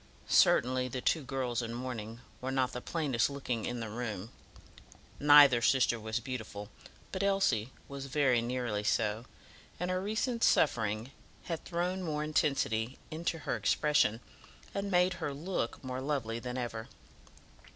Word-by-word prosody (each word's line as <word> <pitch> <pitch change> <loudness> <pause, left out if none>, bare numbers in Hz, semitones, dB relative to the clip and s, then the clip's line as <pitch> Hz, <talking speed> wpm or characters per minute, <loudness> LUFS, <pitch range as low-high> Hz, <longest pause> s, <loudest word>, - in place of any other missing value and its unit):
Certainly 130 +1 +4
the 130 +1 -4
two 160 +5 +1
girls 130 -3 -2
in 115 0 -4
mourning 120 -2 -5 0.2
were 130 - -3
not 130 -1 +1
the 125 - -5
plainest 145 -8 0
looking 130 -5 -3
in 120 -1 -3
the 115 - -4
room. 110 -3 -4 0.9
Neither 145 -4 +8
sister 120 -1 +3
was 110 +2 -2
beautiful, 110 -4 -6 0.4
but 190 - -3
Elsie 190 - +2 0.2
was 140 -1 -6
very 135 -4 +3
nearly 120 -3 -2
so, 110 +2 0 0.5
and 180 +1 -1
her 185 0 0
recent 230 +4 -1
suffering 110 -3 +2 0.3
had 165 -2 -4
thrown 180 +2 -1
more 150 -4 -2
intensity 135 -6 0
into 165 +1 -2
her - - 0
expression, 115 +1 +2 0.5
and 200 0 -2
made 180 0 +3
her 145 -3 -2
look 160 -6 -3
more 130 0 -4
lovely 130 -5 -2
than 125 +1 -5
ever. 115 -3 -4
130 Hz, 145 wpm, -32 LUFS, 115-150 Hz, 0.9 s, Neither